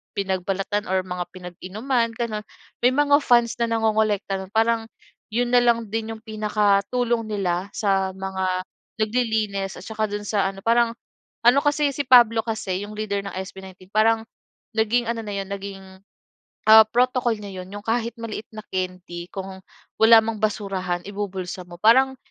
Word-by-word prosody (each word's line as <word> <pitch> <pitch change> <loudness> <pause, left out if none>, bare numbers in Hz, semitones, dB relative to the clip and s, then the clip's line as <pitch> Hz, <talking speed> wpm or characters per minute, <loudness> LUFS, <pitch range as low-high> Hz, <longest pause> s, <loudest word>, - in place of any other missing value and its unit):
pinagbalatan 195 +2 -2
or 190 0 +1
mga 180 0 -3
pinag-inuman, 210 +7 -2
ganun. 220 -3 -3 0.4
May 250 - +6
mga 285 +1 +4
fans 240 -2 +3
na 235 - +2
nangongolekta 215 -3 +1
nun. 190 - -13
Parang 225 +1 +2 0.5
yun 240 +3 +1
na 245 -1 +5
lang 235 -2 +2
din 225 +1 -3
yung - - -12
pinakatulong 215 +2 +1
nila 195 -2 -2
sa 195 -2 0
mga 190 0 -4 0.6
naglilinis 215 -4 -1
at 180 - -11
saka 220 -1 -2
dun 205 0 -4
sa 200 -2 +1
ano, 195 - -12
parang 230 +3 +3 0.6
ano 250 +3 +7
kasi, 290 -1 +1
si 285 - -1
Pablo 235 -3 +6
kasi 205 -4 -3
yung 205 - -8
leader 205 -2 -3
ng 195 - -6
SB19, 190 -1 -10
parang 220 +2 +2 0.5
naging 230 +2 +1
ano 230 -1 -2
na 210 - -6
yun, 195 -1 -3
naging, 200 -1 -6 0.9
ah, 220 0 +10
protocol 245 +1 +2
niya 195 -3 -7
yun. 180 - -14
Yung 205 - -18
kahit 235 0 0
maliit 225 -1 -6
na 215 - -7
candy 180 -2 -4
kung 190 -1 -6 0.4
wala 225 +1 +8
mang 220 -1 -3
basurahan, 195 -4 -1
ibubulsa 190 -2 -5
mo 175 0 -12
parang 260 +6 +5
215 Hz, 160 wpm, -23 LUFS, 195-230 Hz, 0.9 s, ah